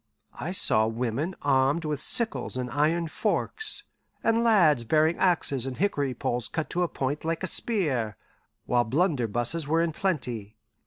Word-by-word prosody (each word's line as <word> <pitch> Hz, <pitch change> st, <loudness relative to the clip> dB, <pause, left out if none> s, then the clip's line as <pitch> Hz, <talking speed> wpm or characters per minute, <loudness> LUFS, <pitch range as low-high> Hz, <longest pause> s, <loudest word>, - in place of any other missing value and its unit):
I -, -, -3 dB
saw 110 Hz, 0 st, +3 dB
women 125 Hz, +9 st, -2 dB
armed 140 Hz, +3 st, +2 dB
with 150 Hz, -2 st, -2 dB
sickles 150 Hz, -, 0 dB
and 125 Hz, -1 st, -3 dB
iron 160 Hz, +4 st, +1 dB
forks, 435 Hz, -, -1 dB, 0.4 s
and 230 Hz, +1 st, +2 dB
lads 170 Hz, -, +4 dB
bearing 155 Hz, +7 st, +2 dB
axes 140 Hz, -8 st, +2 dB
and 130 Hz, -, -5 dB
hickory 145 Hz, -9 st, 0 dB
poles 120 Hz, 0 st, -1 dB
cut 160 Hz, -2 st, -4 dB
to 180 Hz, -, -1 dB
a 175 Hz, -, +2 dB
point 140 Hz, -1 st, -3 dB
like 165 Hz, +2 st, -2 dB
a -, -, +1 dB
spear, 140 Hz, -, -1 dB, 0.5 s
while 120 Hz, -1 st, +2 dB
blunderbusses 130 Hz, -, -1 dB
were 160 Hz, +2 st, +2 dB
in 170 Hz, -, 0 dB
plenty. 125 Hz, -, -3 dB
150 Hz, 155 wpm, -27 LUFS, 125-170 Hz, 0.5 s, lads